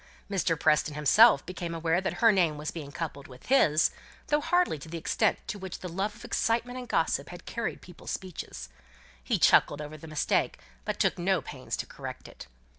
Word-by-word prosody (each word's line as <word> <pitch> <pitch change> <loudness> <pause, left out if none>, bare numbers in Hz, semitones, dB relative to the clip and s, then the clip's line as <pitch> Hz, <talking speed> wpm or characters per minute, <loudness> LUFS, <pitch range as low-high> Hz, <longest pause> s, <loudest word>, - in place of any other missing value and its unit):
Mr. 170 -5 +1
Preston 150 0 +2
himself 210 - +6
became 175 -2 -5
aware 165 +2 +1
that 190 - -2
her 230 - +8
name 170 -7 +2
was 150 0 -4
being 150 -4 -7
coupled 145 -3 -5
with 125 -1 -14
his, 160 - +4 0.4
though 295 0 +3
hardly 355 - +1
to 150 - -10
the 170 - -5
extent 165 - +1
to 205 - -5
which 190 -2 -6
the 185 - -7
love 195 +5 -2
of - - -12
excitement 240 +2 0
and 250 - -8
gossip 145 -3 0
had 175 0 -10
carried 235 -2 -4
people's 180 -2 -11
speeches; 175 - -6 0.6
he - - +1
chuckled 145 - +4
over 150 +1 -7
the 160 - -11
mistake, 155 -1 0 0.3
but - - -3
took - - +1
no 185 +1 +2
pains 130 -4 -6
to - - -3
correct - - -8
it. - - -12
170 Hz, 195 wpm, -28 LUFS, 150-195 Hz, 0.6 s, her